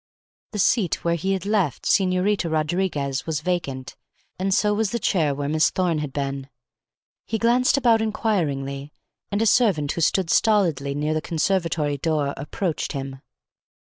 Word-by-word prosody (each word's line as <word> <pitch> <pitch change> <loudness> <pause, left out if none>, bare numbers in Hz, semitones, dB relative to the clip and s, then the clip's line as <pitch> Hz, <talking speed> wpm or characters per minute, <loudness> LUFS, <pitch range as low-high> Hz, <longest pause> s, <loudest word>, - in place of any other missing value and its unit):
The - - -3
seat 195 -2 +1
where 170 - +1
he 190 +4 -1
had 190 -1 -3
left 200 -10 0
Señorita 185 -1 +2
Rodriguez 155 -4 -1
was 155 -2 -1
vacant; 155 -7 -3 0.5
so 210 +2 +2
was 215 -1 0
the 235 - -2
chair 160 -9 +1
where 140 0 -3
Miss 155 +1 +3
Thorne 175 -4 0
had 150 -2 -4
been. 135 -1 -4 0.8
He 225 - -1
glanced 245 +4 +3
about 235 -4 +3
inquiringly, 150 - -2 0.4
and 205 +2 +1
a - - +1
servant 195 - +3
who 170 - -3
stood 170 +1 +2
stolidly 165 -11 +2
near 150 +2 -1
the 155 - -1
conservatory 165 -4 0
door 150 -2 0
approached 160 +4 -3
him. 135 -1 -6
165 Hz, 150 wpm, -23 LUFS, 145-200 Hz, 0.8 s, Miss